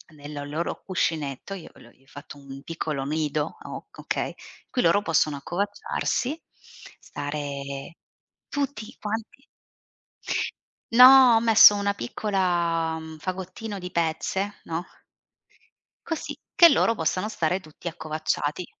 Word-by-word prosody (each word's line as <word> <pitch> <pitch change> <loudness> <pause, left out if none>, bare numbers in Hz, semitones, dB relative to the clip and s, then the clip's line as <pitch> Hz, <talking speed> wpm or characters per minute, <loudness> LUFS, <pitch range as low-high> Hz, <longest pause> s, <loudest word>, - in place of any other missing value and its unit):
nel 145 0 -7
loro 160 +4 -3
cuscinetto, 160 -3 -2
io 185 -4 -8
l 120 - -16
gli 135 - -26
ho 135 - -30
fatto 145 +1 -11
un 135 -1 -11
piccolo 155 -4 -3
nido, 150 +1 -2
ok - - -10
okay, - - -2
in - - -11 0.3
cui 250 - 0
loro 170 +5 +4
possono 155 -5 +1
accovacciarsi, 255 - -2 0.6
stare 145 +1 -6 0.5
tutti 280 -7 -3
quanti 220 +5 -5 1.5
No, 250 0 +9
ho - - +5
messo 220 -2 +8
una 200 0 0
piccola 170 - 0
mhmm, 160 0 -9
fagottino 190 +5 -5
di 180 0 -6
pezze, 170 +5 -1
no. 165 +2 -3 1.2
Così 325 - -4 0.2
che 340 - +9
loro 230 -6 +3
possano 185 +4 -1
stare 180 -2 0
tutti 155 +1 -11
accovacciati. 155 0 -2
170 Hz, 120 wpm, -25 LUFS, 150-205 Hz, 1.5 s, No